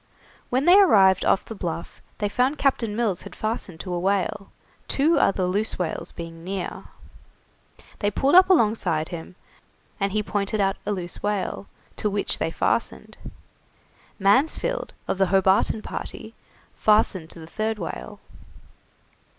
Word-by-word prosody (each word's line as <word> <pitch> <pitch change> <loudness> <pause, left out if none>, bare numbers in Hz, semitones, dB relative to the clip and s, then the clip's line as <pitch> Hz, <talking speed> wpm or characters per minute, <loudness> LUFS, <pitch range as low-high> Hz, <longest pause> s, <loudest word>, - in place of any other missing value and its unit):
When 260 +3 +1
they 365 +3 +8
arrived 190 - +5
off 195 - +2
the - - -7
Bluff 170 -4 -6 0.2
they 205 - -1
found 255 +7 +1
Captain 230 -6 0
Mills 215 -6 0
had - - -11
fastened 215 -6 -4
to 180 - -5
a 175 - -1
whale, 195 +1 -1 0.4
two 300 +3 +2
other 190 -6 +2
loose 205 +4 -1
whales 175 -3 -3
being 165 -1 -9
near. 190 0 -5 1.1
They 205 - +1
pulled 270 +7 +1
up 370 +1 +8
alongside 210 - +2
him, 170 0 -8 0.6
and 195 -1 0
he 210 +1 0
pointed 205 0 -2
out 195 0 +1
a - - +1
loose 180 -3 -5
whale, 205 -1 -2 0.3
to 210 - 0
which 200 0 -2
they - - 0
fastened. - - -1 1.0
Mansfield, 295 - +1
of 190 - -2
the 195 - +4
Hobarton 195 +3 +2
party, 220 - -7 0.4
fastened 210 -6 +2
to 170 - -12
the 160 - -9
third 215 +6 -2
whale. - - -6
200 Hz, 145 wpm, -24 LUFS, 185-225 Hz, 1.1 s, they